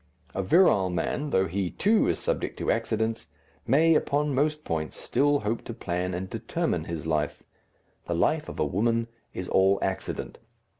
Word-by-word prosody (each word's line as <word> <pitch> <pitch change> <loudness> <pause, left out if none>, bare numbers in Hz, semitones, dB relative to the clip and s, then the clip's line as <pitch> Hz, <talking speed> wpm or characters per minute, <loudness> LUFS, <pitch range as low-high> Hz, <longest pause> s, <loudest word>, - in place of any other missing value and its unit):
A 95 - -1
virile 100 - +4
man, 90 - -2
though 95 -7 +2
he, 95 +1 -2
too, 215 - +2
is - - +1
subject - - -2
to - - 0
accidents, 110 -4 -1 0.4
may, 160 +4 +5
upon 150 -1 +1
most 150 +3 +1
points, 80 - -3
still 145 +1 +1
hope 110 +2 -2
to 115 - -6
plan 90 -1 -2
and 95 +1 -4
determine 115 - -2
his 85 -2 -5
life; 75 -2 -1 0.6
the - - -1
life - - +1
of - - -8
a - - +2
woman 115 +4 0 0.3
is 90 - -4
all 95 +1 +4
accident. 95 0 -3
105 Hz, 165 wpm, -27 LUFS, 90-145 Hz, 0.6 s, may